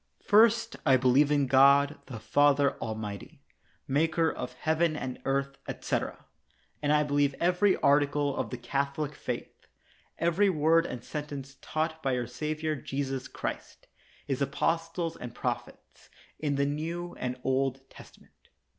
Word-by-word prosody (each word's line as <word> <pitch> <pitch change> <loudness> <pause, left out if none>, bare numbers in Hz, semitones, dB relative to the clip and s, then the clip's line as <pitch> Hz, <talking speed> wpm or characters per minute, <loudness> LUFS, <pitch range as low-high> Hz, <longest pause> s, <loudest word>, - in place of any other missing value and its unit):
First, 230 +2 +4
I 135 -3 +5
believe 130 +3 +4
in 145 -1 +3
God 140 +2 +5
the 125 -5 -7
Father 145 +3 +3
Almighty, 110 -3 -6 0.4
maker 160 +3 +2
of - - -6
heaven 160 0 +1
and 130 -4 -5
earth, 140 0 -1
etc. - - -3 0.6
And 145 0 +1
I 150 0 +4
believe 145 -1 +1
every 180 +3 +3
article 145 0 +2
of - - -2
the 125 - -5
Catholic 140 +4 -2
faith, - - -6 0.5
every 170 +4 +2
word 165 0 +3
and 120 -1 -6
sentence 145 -2 -6
taught 160 +1 -2
by 130 -3 0
our 120 - -2
Savior 155 +5 -3
Jesus 135 -1 -4
Christ, - - -6 0.4
His 135 -1 -2
apostles 165 +4 -1
and 120 -1 -8
prophets, - - -5 0.3
in 145 -2 -1
the 140 0 +1
New 165 +4 -4
and 125 0 -3
Old 135 0 0
Testament. - - -17
145 Hz, 135 wpm, -29 LUFS, 135-160 Hz, 0.6 s, I